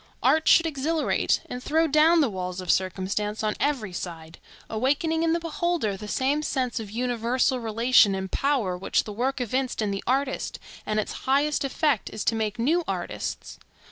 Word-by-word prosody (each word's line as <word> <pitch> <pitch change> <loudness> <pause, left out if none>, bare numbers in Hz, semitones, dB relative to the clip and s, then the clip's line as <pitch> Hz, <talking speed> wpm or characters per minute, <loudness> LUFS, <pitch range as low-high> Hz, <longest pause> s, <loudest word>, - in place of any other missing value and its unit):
Art 315 0 +3
should 335 - +6
exhilarate, 315 +1 0
and 250 - -6
throw 320 +5 +2
down 320 +2 +5
the 280 - +2
walls 185 -1 -4
of 180 -3 0
circumstance 195 +3 -1
on 215 0 +1
every 250 -10 -1
side, 165 -2 -7 0.3
awakening 285 +8 0
in 330 0 +2
the 340 - +1
beholder 330 - -1
the 210 +2 -8
same 270 +7 0
sense 255 -5 -1
of 215 -2 -7
universal 245 +3 0
relation 230 -2 +4
and 190 0 -4
power 260 -10 0
which 180 +2 0
the 210 - -7
work 260 +5 -1
evinced 255 +2 -2
in 210 -2 0
the 195 - -4
artist, 270 +2 -1 0.3
and 215 0 0
its 215 - -3 0.2
highest 285 +2 +2
effect 275 - 0
is 215 - -5
to - - +3
make 220 0 -2
new 315 +9 +2
artists. - - -5
250 Hz, 175 wpm, -25 LUFS, 210-290 Hz, 0.3 s, should